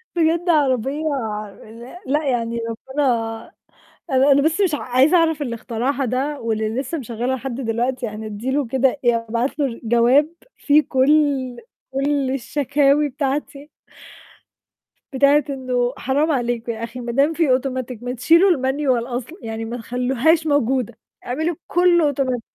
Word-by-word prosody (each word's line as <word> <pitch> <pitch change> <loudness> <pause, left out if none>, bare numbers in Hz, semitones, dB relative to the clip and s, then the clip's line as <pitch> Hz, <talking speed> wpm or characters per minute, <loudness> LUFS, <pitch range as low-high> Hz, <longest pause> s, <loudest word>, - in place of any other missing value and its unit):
بجد 340 +1 +1
عربية 280 -1 +1 0.6
لأ 235 +10 -12
لأ، 300 +3 +1
يعني 235 -1 -1
ربِّنا 265 +5 -3 1.1
أنا 270 +2 +4
أنا 280 +1 +4
بس 320 +6 +1
مش 360 -6 +2
ع - - -4
عايزة 260 +8 +3
أعرف 320 -3 +2
اللي 240 -4 -3
اخترعها 250 +5 -2
ده 270 +4 -2
واللي 220 -1 -1
لسّه 295 +5 -4
مشغّلها 245 +1 -3
لحد 255 -1 -5
دلوقتي 245 +2 -1
يعني 215 0 -6
أدّي 215 +5 -4
له 275 -1 0
كده 265 +2 +2 0.2
آآ، 230 -1 +2
أبعت 240 +6 -2
له 265 -5 -2
جواب 240 +6 +4 0.3
فيه 300 +1 +3
كل 265 -2 +2 0.4
كل 275 0 0
الشكاوي 280 +2 +1
بتاعتي. 280 +2 -4 1.4
بتاعة 280 +2 +4
إنه 255 -2 -1
حرام 290 +5 0
عليك 240 -3 -1
يا 230 0 -4
أخي 235 +2 -6
ما 240 -1 -4
دام 280 +6 +2
في 330 -1 +1
automatic 255 -3 -5
ما 245 - -3
تشيلوا 335 +10 +4
الManual 265 -3 0
أصلًا، 255 - -5
يعني 225 0 -5
ما 235 +2 -5
تخلّوهاش 260 +7 +1
موجودة، 265 -4 +1 0.3
اعملوا 315 +7 -2
كُلّه 345 -4 +3
automatic 255 -3 -1
265 Hz, 145 wpm, -21 LUFS, 240-290 Hz, 1.4 s, أنا